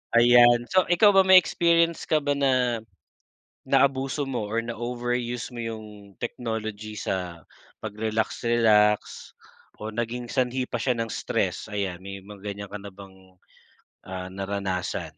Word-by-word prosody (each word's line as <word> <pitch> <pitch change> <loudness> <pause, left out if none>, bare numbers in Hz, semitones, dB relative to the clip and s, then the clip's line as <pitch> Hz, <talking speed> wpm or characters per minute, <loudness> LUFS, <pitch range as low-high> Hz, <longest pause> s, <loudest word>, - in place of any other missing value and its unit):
Ayan, 120 0 +6
so 185 -1 +3
ikaw 180 +4 +5
ba 195 - +5
may 190 - +8
experience 170 -2 +3
ka 155 -2 +2
ba 145 - 0
na 130 -4 +1 0.9
naabuso 135 +1 +2
mo 120 -6 -3
or 115 +1 -1
na 120 - -4
overuse 120 +1 -3
mo 120 - -5
yung 110 -1 -5 0.3
technology 110 -3 -5
sa 90 -4 -4 0.4
pagrelax-relax 110 0 +2 0.8
o 110 0 -6
naging 120 +1 -3
sanhi 125 +1 -1
pa 120 - -4
siya 125 -3 0
ng 115 -1 -3
stress - - -2
ayan, 95 -4 -3
may 100 0 -7
mga 100 -1 -12
ganyan 100 -1 -6
ka 105 - -6
na 100 - -8
bang 95 -1 -16 0.7
ah, 95 -1 -6
naranasan? 95 -1 -4
115 Hz, 140 wpm, -25 LUFS, 100-125 Hz, 0.9 s, may